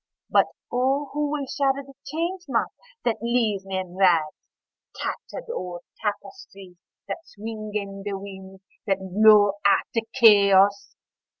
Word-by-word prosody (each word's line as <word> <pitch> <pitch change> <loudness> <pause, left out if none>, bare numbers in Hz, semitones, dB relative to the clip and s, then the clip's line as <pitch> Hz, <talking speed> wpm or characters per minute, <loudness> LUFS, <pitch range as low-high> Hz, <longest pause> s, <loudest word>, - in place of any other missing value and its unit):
(But - - +4 0.2
O 270 +3 0
who 295 0 -1
will 290 -1 -2
shatter 275 +1 0
the 275 - -15
Change 340 +5 -3
Moth 235 -3 0 0.3
that 235 -3 0
leaves 225 -5 0
me 190 -1 -3
in 185 -1 -5
rags—tattered 175 - -2
old 175 -1 -5 0.2
tapestries 195 -3 -6 0.3
that - - -4
swing 215 0 -7
in 195 -1 -4
the 200 0 -4
winds 190 -1 -11 0.2
that 195 -1 +2
blow 205 +1 +4
out 200 - +2
of 225 -1 0
Chaos!) 200 -4 +5
205 Hz, 130 wpm, -24 LUFS, 195-250 Hz, 0.3 s, Chaos